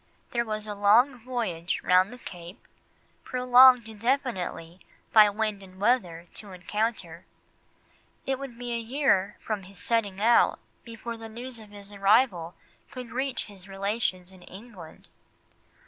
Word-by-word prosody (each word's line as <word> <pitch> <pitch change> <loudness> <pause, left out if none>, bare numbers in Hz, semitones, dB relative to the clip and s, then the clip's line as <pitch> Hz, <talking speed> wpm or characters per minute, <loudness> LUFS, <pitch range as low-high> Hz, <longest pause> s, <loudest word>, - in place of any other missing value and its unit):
There 235 -1 0
was 215 -1 -4
a 210 - -4
long 225 +6 +4
voyage 220 -9 -2
round 185 +3 +4
the 250 - -10
Cape, 175 -2 -11 0.6
prolonged 250 -1 +6
indefinitely 220 - -2 0.3
by 215 -2 +8
wind 210 -1 -2
and 185 -1 -15
weather, 190 -7 +1
to 205 -3 -9
encounter. 210 +5 -3 1.0
It 265 -1 -1
would 270 -4 -8
be 245 0 -5
a 235 - -1
year 225 -5 +1
from 215 -2 -2
his 195 +1 -14
setting 205 -2 0
out 230 +3 +4 0.3
before 230 0 -7
the 225 0 -9
news 240 +2 -9
of 215 -1 -14
his 205 0 -10
arrival 200 -4 +2 0.3
could 255 -3 -9
reach 265 +1 -2
his 195 -2 -13
relations 195 -2 -2
in 185 -1 -17
England. 190 -3 -13
215 Hz, 140 wpm, -27 LUFS, 195-240 Hz, 1.0 s, by